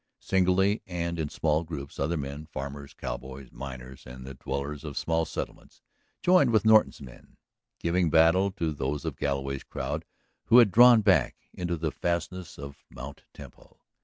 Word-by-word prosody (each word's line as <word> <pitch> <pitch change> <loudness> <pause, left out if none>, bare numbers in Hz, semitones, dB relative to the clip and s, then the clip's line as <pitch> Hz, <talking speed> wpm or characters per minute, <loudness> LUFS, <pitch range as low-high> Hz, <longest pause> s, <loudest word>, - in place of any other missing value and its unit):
Singly 95 +2 +2
and 85 -2 -3
in 75 -2 -2
small 80 +1 0
groups 75 -4 -8
other 85 +1 0
men, 70 +2 -6
farmers, 70 -1 -7
cowboys, 65 +1 -7
miners, 65 0 -9
and 65 0 -10
the 65 - -8
dwellers 70 +3 -5
of 75 -3 -7
small 80 0 0
settlements, - - -7 0.4
joined 180 -7 +5
with 110 -3 +2
Norton's 110 -6 +5
men, 60 -3 -14 0.4
giving 85 0 +1
battle 85 +5 +4
to 85 -5 -2
those 70 0 -3
of - - -3
Galloway's 70 -1 -2
crowd - - -4 0.4
who 120 - +6
had 115 -5 +7
drawn 120 +2 +8
back 100 -3 +3 0.2
into 85 -1 -3
the 80 -1 -2
fastnesses 85 +1 -3
of 70 0 -10
Mt. 70 +3 -10
Temple. - - -15
80 Hz, 160 wpm, -27 LUFS, 70-90 Hz, 0.4 s, drawn